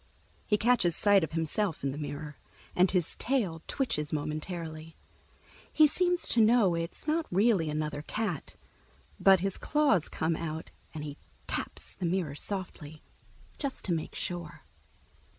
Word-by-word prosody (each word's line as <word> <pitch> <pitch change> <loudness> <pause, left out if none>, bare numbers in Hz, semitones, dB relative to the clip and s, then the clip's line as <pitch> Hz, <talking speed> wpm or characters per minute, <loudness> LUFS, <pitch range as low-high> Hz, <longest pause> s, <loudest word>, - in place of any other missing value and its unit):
He 210 - +3
catches 220 -7 +3
sight 205 -3 +5
of 160 - -3
himself 165 +2 -1
in 135 - 0
the 140 - -6
mirror, 150 0 -6 0.4
and 180 +1 +5
his 180 -4 0
tail 205 -12 0
twitches 225 - -1
momentarily. 155 +1 -4 0.8
He 310 - +6
seems 355 +3 +1
to 235 - +4
know 220 -4 +5
it's 165 +1 -4
not 320 +1 +1
really 195 -4 +3
another 150 -1 -2
cat, 195 -1 -3 0.6
but 190 -2 +6
his 195 0 -1
claws 290 - +2
come 160 +1 0
out 160 -1 -5 0.2
and 150 - -4
he 145 -1 -6 0.3
taps - - -4
the 180 - -3
mirror 170 -4 -1
softly, 160 -3 -5 0.6
just 280 -3 -4
to 180 - +1
make 160 -2 -3
sure. 175 -3 -4
175 Hz, 145 wpm, -30 LUFS, 155-215 Hz, 0.8 s, He